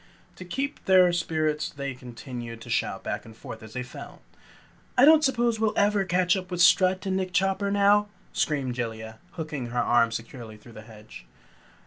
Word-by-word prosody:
To 185 Hz, -, -9 dB
keep 275 Hz, +10 st, -3 dB
up -, -, -32 dB
their 185 Hz, -2 st, +5 dB
spirits 155 Hz, -3 st, -1 dB
they 140 Hz, -1 st, -5 dB
continued 120 Hz, -1 st, -8 dB
to -, -, -9 dB
shout -, -, -1 dB
back -, -, -4 dB
and 110 Hz, -1 st, -14 dB
forth 110 Hz, -, -9 dB
as 110 Hz, 0 st, -12 dB
they 125 Hz, -, -3 dB
fell. 125 Hz, -, -11 dB, 0.7 s
"I 255 Hz, -, +7 dB
don't 310 Hz, 0 st, +7 dB
suppose 240 Hz, -5 st, +1 dB
we'll 220 Hz, -1 st, 0 dB
ever 205 Hz, -1 st, +2 dB
catch 180 Hz, +1 st, +2 dB
up 185 Hz, -1 st, -5 dB
with 180 Hz, -2 st, -4 dB
Strut 185 Hz, +1 st, +4 dB
and 190 Hz, -1 st, -1 dB
Nick 185 Hz, -1 st, -3 dB
Chopper 195 Hz, +2 st, +1 dB
now," 205 Hz, +1 st, +3 dB, 0.3 s
screamed 140 Hz, -5 st, -1 dB
Jellia, 110 Hz, -2 st, -5 dB
hooking 150 Hz, -6 st, -5 dB
her 120 Hz, +1 st, -6 dB
arms 115 Hz, -1 st, +2 dB
securely 115 Hz, -2 st, -8 dB
through 115 Hz, +2 st, -16 dB
the 110 Hz, -, -10 dB
hedge. 110 Hz, -1 st, -14 dB
160 Hz, 185 wpm, -26 LUFS, 120-195 Hz, 0.7 s, I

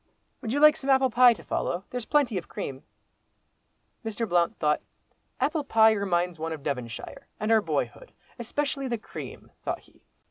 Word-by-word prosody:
Would 225 Hz, -, -4 dB
you 285 Hz, -, +1 dB
like 305 Hz, 0 st, +8 dB
some 275 Hz, -, -5 dB
apple 265 Hz, -1 st, +4 dB
pie 245 Hz, +1 st, +7 dB
to -, -, -13 dB
follow, 175 Hz, +2 st, -2 dB
there's 250 Hz, -2 st, -4 dB
plenty 280 Hz, -6 st, +2 dB
of 170 Hz, -, -13 dB
cream?" 135 Hz, 0 st, -6 dB, 1.2 s
Mr. 225 Hz, +1 st, -3 dB
Blount 175 Hz, -2 st, +2 dB
would. 150 Hz, -1 st, +2 dB, 0.6 s
"Apple 305 Hz, 0 st, +1 dB
pie 225 Hz, -5 st, +5 dB
reminds 180 Hz, -5 st, 0 dB
one 160 Hz, +1 st, -3 dB
of 150 Hz, -3 st, -8 dB
Devonshire, 125 Hz, -5 st, -5 dB
and 215 Hz, +2 st, 0 dB
our 220 Hz, -1 st, +6 dB
boyhood—especially 275 Hz, -, -3 dB
the 240 Hz, -2 st, -1 dB
cream," 215 Hz, -, -9 dB
thought -, -, -3 dB
he. -, -, -25 dB
225 Hz, 165 wpm, -27 LUFS, 175-265 Hz, 1.2 s, like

